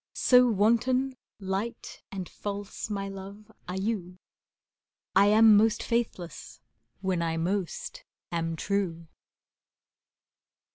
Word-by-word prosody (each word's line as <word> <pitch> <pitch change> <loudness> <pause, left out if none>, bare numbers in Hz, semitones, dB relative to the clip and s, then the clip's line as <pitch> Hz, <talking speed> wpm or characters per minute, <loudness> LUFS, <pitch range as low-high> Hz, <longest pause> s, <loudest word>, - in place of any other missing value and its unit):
So 250 -1 +6
wanton, 235 +5 +2 0.2
light 195 +4 -4
and 190 -2 -5
false, 205 +1 -6
my 200 -1 -3
love, 200 +2 -9 0.2
are 180 +1 -4
you, 190 -4 -3 1.0
I 195 +1 +6
am 215 +1 +7
most 220 +2 +3
faithless 180 - -3 0.4
when 190 -3 0
I 165 -1 -1
most 180 +1 -3 0.3
am 165 -1 -1
true. 180 -3 -2
200 Hz, 100 wpm, -28 LUFS, 180-220 Hz, 1.0 s, am